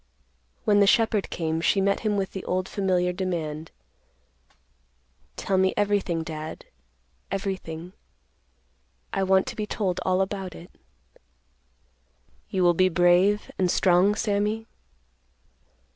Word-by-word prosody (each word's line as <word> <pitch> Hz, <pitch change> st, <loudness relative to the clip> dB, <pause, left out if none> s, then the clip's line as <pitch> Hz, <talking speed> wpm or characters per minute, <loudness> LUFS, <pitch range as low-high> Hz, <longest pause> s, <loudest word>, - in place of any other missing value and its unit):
When 205 Hz, -2 st, +4 dB
the 200 Hz, -, +5 dB
shepherd 220 Hz, -2 st, +2 dB
came, 160 Hz, -1 st, -2 dB
she 195 Hz, -, +2 dB
met 200 Hz, +1 st, +2 dB
him 210 Hz, -2 st, 0 dB
with 195 Hz, -1 st, -2 dB
the 190 Hz, -, -6 dB
old 185 Hz, +1 st, -1 dB
familiar 180 Hz, -2 st, 0 dB
demand, 165 Hz, -4 st, -3 dB, 1.7 s
"Tell 190 Hz, -1 st, 0 dB
me 190 Hz, 0 st, +2 dB
everything, 200 Hz, -5 st, 0 dB
Dad; 155 Hz, -1 st, -7 dB, 0.6 s
everything. 185 Hz, -3 st, -4 dB, 1.2 s
I 195 Hz, -, 0 dB
want 190 Hz, 0 st, +3 dB
to -, -, -6 dB
be 210 Hz, -1 st, -3 dB
told 190 Hz, -5 st, -1 dB
all 185 Hz, 0 st, +2 dB
about 190 Hz, -2 st, -3 dB
it." 175 Hz, -, -12 dB, 1.8 s
"You 190 Hz, -2 st, 0 dB
will 175 Hz, 0 st, +5 dB
be 185 Hz, +2 st, +3 dB
brave 180 Hz, +4 st, +3 dB
and 185 Hz, -1 st, +2 dB
strong, 185 Hz, +3 st, +3 dB
Sammy?" 210 Hz, +1 st, -1 dB
190 Hz, 120 wpm, -25 LUFS, 175-200 Hz, 1.8 s, the